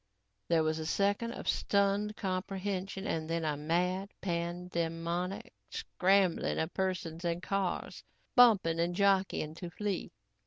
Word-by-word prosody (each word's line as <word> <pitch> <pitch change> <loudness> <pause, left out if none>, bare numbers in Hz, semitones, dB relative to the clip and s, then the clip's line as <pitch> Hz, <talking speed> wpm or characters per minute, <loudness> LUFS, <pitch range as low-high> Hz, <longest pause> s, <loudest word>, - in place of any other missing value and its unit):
There 165 -1 +3
was 155 0 0
a 160 - -4
second 205 +6 +1
of - - -8
stunned 200 +1 +1
comprehension 195 0 -3
and 160 -4 -2
then 165 -1 -1
a 150 -1 0
mad, 180 +6 0
pan 175 0 -2
demonic 170 +2 -2 0.2
scrambling 190 -1 +2
of 160 +2 -1
persons 180 -3 -2
and 170 0 0
cars, 195 -2 -2 0.3
bumping 200 -10 +6
and 170 +1 +1
jockeying 195 -5 +2
to 175 +2 -7
flee. 200 +1 -3
180 Hz, 130 wpm, -32 LUFS, 165-195 Hz, 0.3 s, bumping